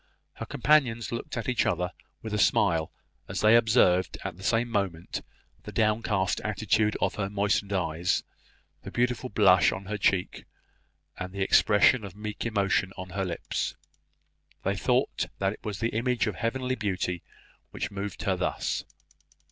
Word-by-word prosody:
Her - - -7
companions 130 -7 +2
looked 115 +1 -5
at 115 - -3
each 125 -2 +2
other 90 0 0 0.3
with 110 -1 -5
a 105 - 0
smile 85 -6 +3 0.4
as - - -3
they 110 +2 +6
observed 110 -6 +4
at 95 -3 -4
the 95 - -14
same 115 +4 +1
moment 100 -7 -2 0.4
the - - -9
downcast 105 -3 +1
attitude 105 +1 +1
of - - +1
her 95 - -1
moistened 100 0 0
eyes, 90 -2 0 0.6
the - - -8
beautiful 125 +1 -1
blush 95 -4 +5
on 95 +1 -6
her 105 +1 -4
cheek, 95 -2 0 0.7
and 90 0 -5
the 100 0 -2
expression 105 +4 +4
of 100 -2 -8
meek 105 +2 -4
emotion 100 -3 +1
on 95 0 -7
her 95 +1 -2
lips. 90 -2 -3 0.9
They - - 0
thought - - +1
that 95 +1 0
it - - -15
was 105 -3 -4
the 115 - 0
image 120 +2 0
of 110 - -1
heavenly 125 +5 -2
beauty 95 -6 -2 0.5
which - - -4
moved 100 -1 -5
her - - +1
thus. - - -2
105 Hz, 160 wpm, -28 LUFS, 95-115 Hz, 0.9 s, they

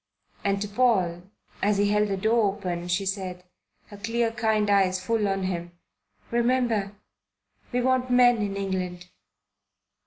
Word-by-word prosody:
And 200 0 +1
to - - -4
Paul, 200 -6 +1 0.4
as 205 0 +2
he 205 0 +2
held 210 0 +2
the 195 -1 -2
door 220 0 +2
open, 175 -2 -4
she 185 +3 0
said, 185 -2 -4 0.5
her 205 - -10
clear 230 +2 -1
kind 220 -2 +1
eyes 190 -2 +3
full 210 +2 0
on 195 -1 -1
him, 175 -2 -3 0.6
"Remember, 235 -4 +1 0.8
we 250 0 0
want 255 0 +1
men 245 -1 +5
in 200 -2 -2
England." 180 -2 -3
205 Hz, 145 wpm, -26 LUFS, 190-230 Hz, 0.8 s, men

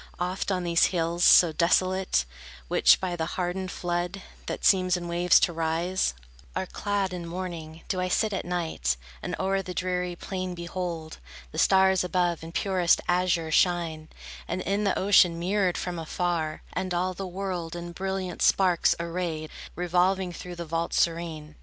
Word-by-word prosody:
Oft, 180 +3 -2
on 180 -1 0
these 170 -1 +4
hills, 170 -1 -1
so 175 -3 +7
desolate, 185 - +2 0.4
Which - - +5
by 180 -2 -2
the 160 -1 -2
hardened 185 +1 -2
flood, 175 +2 -3 0.2
That - - -4
seems 185 -2 +4
in 175 -1 -6
waves 175 +1 +4
to 170 - +2
rise, 165 - 0 0.4
Are - - -1
clad 200 -1 -2
in 175 -2 -5
mourning, 165 -3 -6
do 185 -2 -1
I 185 - 0
sit 215 +3 +1
at 190 - -2
night, 160 - -1 0.2
And - - -3
o'er 195 0 +1
the 180 -1 -7
dreary 180 -1 -1
plain 185 0 -5
behold 170 -2 -5 0.3
The - - -4
stars 190 -1 +4
above 175 -2 0
in 165 - -8
purest 185 -1 +2
azure 175 -2 +1
shine, 165 -2 +1 0.4
And 185 +2 -2
in 200 +3 -1
the 195 - +1
ocean 185 -3 +5
mirrored 185 +1 0
from 175 -2 -4
afar, 165 -1 -2
And 185 -1 -2
all 185 +1 0
the 190 +1 -5
world 180 -3 -4
in 175 0 -6
brilliant 190 0 -4
sparks 180 -3 +3
arrayed, 170 -2 -3 0.2
Revolving 180 +1 +1
through 180 +1 -8
the 170 0 -6
vault 165 +1 -2
serene. 165 -2 -1
175 Hz, 165 wpm, -27 LUFS, 170-185 Hz, 0.4 s, so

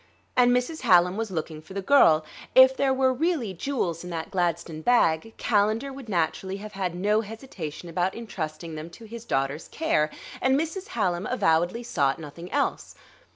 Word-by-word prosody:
And 245 -1 +5
Mrs. 250 +6 0
Hallam 180 -6 +5
was 225 0 -2
looking 160 -3 -4
for 175 +5 -13
the 195 - -2
girl; 165 - +5 0.3
if 260 0 +8
there 270 0 +2
were 260 0 +3
really 290 - -1
jewels 180 - -2
in 180 - -7
that 165 -2 -5
gladstone 170 -3 -1
bag, 225 -1 +2
Calendar 220 +5 +1
would 265 -4 -10
naturally 190 +2 -1
have 210 +1 -8
had 190 -3 -3
no 210 +4 +2
hesitation 205 - -8
about 175 +3 -1
intrusting 165 -7 -6
them 155 +1 -7
to 225 +7 -13
his 230 +1 -9
daughter's 135 -4 -1
care; 295 - +1 0.3
and 265 +1 +3
Mrs. 330 +5 -4
Hallam 185 -2 0
avowedly 190 -1 +1
sought 140 - +1
nothing 165 +3 -9
else. 285 -1 -1
195 Hz, 170 wpm, -26 LUFS, 165-245 Hz, 0.3 s, if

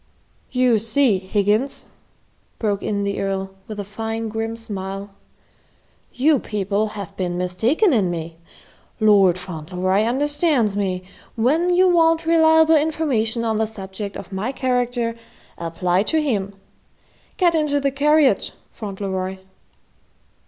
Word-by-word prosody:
"You 250 -3 +3
see, 225 -1 +2
Higgins," 205 +7 0 0.7
broke 205 -3 -1
in 200 -1 -2
the 200 0 -2
Earl 195 -1 -2 0.2
with 215 -1 -7
a - - -2
fine 225 +2 -4
grim 225 +1 -3
smile, 195 -2 -5 1.0
"you 285 +2 +3
people 210 +1 -2
have 200 -2 -7
been 175 -2 -2
mistaken 225 - +1
in 200 -7 +2
me. 165 -1 -5 0.6
Lord 200 -5 +5
Fauntleroy 185 +2 -2
understands 275 - +1
me. 185 -3 -1 0.3
When 300 +10 +2
you 365 +1 +4
want 330 -2 +3
reliable 320 -1 +5
information 275 -8 0
on 220 -1 0
the 220 0 +1
subject 200 -1 -7
of 190 0 -9
my 205 +7 -2
character, 245 -3 -1 0.4
apply 175 +2 0
to 320 - +2
him. 205 -10 -1 0.8
Get 350 -2 +3
into 300 -3 +1
the 275 0 0
carriage, 295 0 +3 0.2
Fauntleroy." 190 -3 -4
220 Hz, 125 wpm, -21 LUFS, 195-275 Hz, 1.0 s, Lord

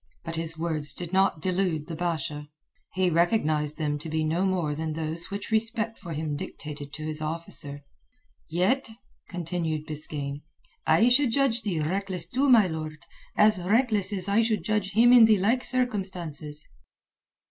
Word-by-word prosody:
But 165 - -5
his 165 0 -4
words 160 -3 0
did 175 0 -5
not 190 -4 +2
delude 180 -5 0
the 165 - -6
Basha. 155 -3 -3 0.5
He 185 -1 +2
recognized 155 -4 +2
them 150 -2 -1
to 160 - -7
be 160 0 -1
no 165 +5 0
more 175 -6 0
than 155 +1 -3
those 160 +1 -1
which 200 +3 -6
respect 225 0 0
for 175 -5 -7
him 150 -1 -3
dictated 145 0 -7
to 155 0 -6
his 155 0 -5
officer. 155 -2 -1 0.7
"Yet," 190 +11 +1 0.4
continued 165 -3 -3
Biskaine, 145 -2 -5 0.5
"I 165 +9 +5
should 260 +1 +4
judge 250 -2 +2
thee 185 -8 -2
reckless 180 +1 -2
too, 265 +8 +1
my 230 -5 +7
lord, 155 -2 -6 0.3
as 210 -3 +5
reckless 215 +1 +2
as 190 -2 -1
I 200 +3 +3
should 225 -2 0
judge 210 -2 -1
him 240 +4 +6
in 240 -2 +9
the 220 -1 +5
like 225 +7 +1
circumstances." 180 - -2
175 Hz, 160 wpm, -26 LUFS, 155-210 Hz, 0.7 s, in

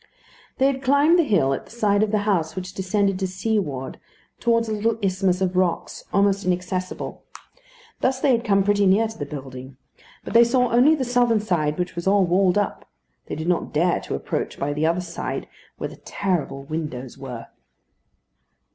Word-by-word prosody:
They 265 - +3
had 270 -1 +1
climbed 285 +6 +4
the - - +5
hill 180 - +2
at - - -5
the - - -19
side 210 -3 +1
of 215 - +2
the 210 -1 0
house 170 -7 0
which 185 -1 -6
descended 195 0 0
to 190 - 0
seaward 185 - -2 0.4
towards 230 -1 +2
a 220 - -2
little 220 +1 0
isthmus 190 -2 0
of 185 -1 0
rocks 180 -2 -1
almost 200 0 +2
inaccessible. 185 0 -3 0.8
Thus 260 0 +1
they 275 - +3
had 235 -1 +2
come 200 -4 +3
pretty 205 0 +3
near 205 +4 +4
to 220 - -10
the 145 - -5
building; 130 -2 -8 0.5
but - - -7
they 235 +1 +8
saw 250 0 +2
only 255 +7 +5
the 270 -4 -2
southern 245 -2 +3
side, 165 -8 0
which 180 0 -2
was 170 +2 -4
all 195 -1 +4
walled 180 +2 +3
up. 205 -1 -2 0.4
They - - -4
did 160 +2 -5
not 175 -1 0
dare 170 +4 +2
to - - -5
approach - - -3
by 145 +1 -2
the 150 +2 +1
other 170 +2 +1
side, 175 -1 -5 0.3
where - - -4
the - - -12
terrible 175 -8 -2
windows 140 -4 -5
were. 125 -4 -7
190 Hz, 190 wpm, -23 LUFS, 170-220 Hz, 0.8 s, they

